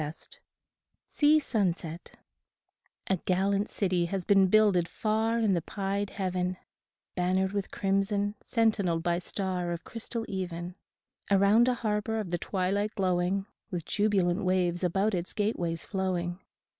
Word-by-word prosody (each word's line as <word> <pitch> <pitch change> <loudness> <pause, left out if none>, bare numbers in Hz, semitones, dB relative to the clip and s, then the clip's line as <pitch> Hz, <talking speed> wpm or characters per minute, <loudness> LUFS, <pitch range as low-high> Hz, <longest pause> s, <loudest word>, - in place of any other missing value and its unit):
12 150 +1 -4 0.9
SEA 300 0 +4
SUNSET 180 - -2 0.9
A 190 - +1
GALLANT 195 +3 0
city 180 -3 0
has 185 +1 -3
been 195 -2 +5
builded 195 -4 +4
far 220 +3 0
In 220 -4 +2
the 170 - +1
pied 200 +2 -2
heaven, 185 -2 -2 0.6
Bannered 185 +1 +1
with 200 -1 -2
crimson, 200 +1 0
sentinelled 205 -8 +1
by 175 0 +1
star 180 -1 -3
Of 170 -1 -4
crystal 230 0 -5
even; 180 -2 -4 0.6
Around 200 +4 +5
a 250 - +2
harbor 220 -1 -1
of 195 -5 -4
the 175 - 0
twilight 200 +4 -1
glowing, 185 0 +1 0.2
With 175 -4 -4
jubilant 200 -2 +1
waves 180 -1 +1
about 195 +4 +1
its 180 -1 -3
gateways 180 -6 -1
flowing. 185 -2 -2
190 Hz, 130 wpm, -29 LUFS, 180-205 Hz, 0.9 s, been